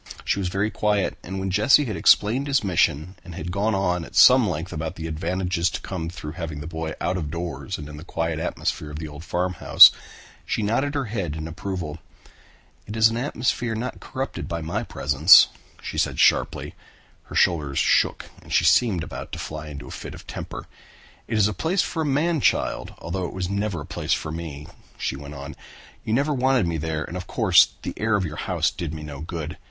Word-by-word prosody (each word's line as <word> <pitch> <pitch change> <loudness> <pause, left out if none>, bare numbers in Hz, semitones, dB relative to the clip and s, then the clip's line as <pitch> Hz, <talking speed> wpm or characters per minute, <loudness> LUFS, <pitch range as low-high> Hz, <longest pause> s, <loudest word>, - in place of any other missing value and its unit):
She - - 0
was 95 - -1
very 95 +4 -1
quiet 105 -2 0
and 95 +2 -6
when 95 0 -2
Jesse 110 +9 +5
had 110 -5 -3
explained 125 +7 +3
his 140 -4 +2
mission 90 -1 +1
and 85 - -10
had 85 +2 -5
gone 100 +3 0
on 90 -3 0
at - - -12
some - - +7
length - - -4
about 80 +1 -4
the 80 - -6
advantages 85 +2 -1
to - - -5
come 85 -4 -4
through 75 -3 -7
having 80 -3 -6
the 75 - -7
boy 80 -1 -5
out 90 +1 -1
of 80 -4 -4
doors 85 0 -4
and 75 - -8
in 75 0 -9
the 75 - -9
quiet 80 -2 -2
atmosphere 75 -1 -3
of 75 - -7
the 80 0 -5
old 75 +1 -10
farmhouse, 90 0 +6 0.5
she 110 - -2
nodded 135 +7 0
her 140 -2 0
head 100 -8 -3
in 80 0 -5
approval. 85 -2 -5 0.9
"It 105 - -6
is 110 0 +6
an 115 - -3
atmosphere 120 -2 -1
not 125 +3 -4
corrupted 135 +1 -5
by 85 - -3
my 80 +2 -2
presence," 75 +5 +6 0.3
she - - -4
said - - 0
sharply. - - +2 0.5
Her - - -10
shoulders 75 -6 +2
shook - - +2 0.2
and - - -15
she - - +3
seemed 100 -9 +3
about - - -8
to - - -3
fly 75 0 -6
into 75 -1 -8
a - - -10
fit - - -7
of - - -13
temper. - - -7 0.6
"It 110 - -1
is 105 -1 +4
a 105 - -2
place 175 - 0
for 165 - -3
a - - 0
man 150 +3 +1
child, - - 0
although 90 +2 -4
it - - -9
was 95 0 -3
never 100 -4 -2
a - - -7
place - - -2
for 80 - -2
me," 80 -3 -6 0.3
she - - -2
went 70 +1 -9
on. 70 0 -8 0.5
"You 110 - -2
never 145 +4 +1
wanted 130 -4 +2
me 85 -1 -1
there 80 0 -2
and 85 - -8
of 90 0 -6
course 100 -8 +5 0.2
the - - -4
air 110 0 +1
of 100 -3 0
your 75 -2 -6
house - - +1
did 85 -3 -5
me 75 - -7
no 75 -2 -8
good. 80 0 -6
90 Hz, 215 wpm, -24 LUFS, 80-105 Hz, 0.9 s, some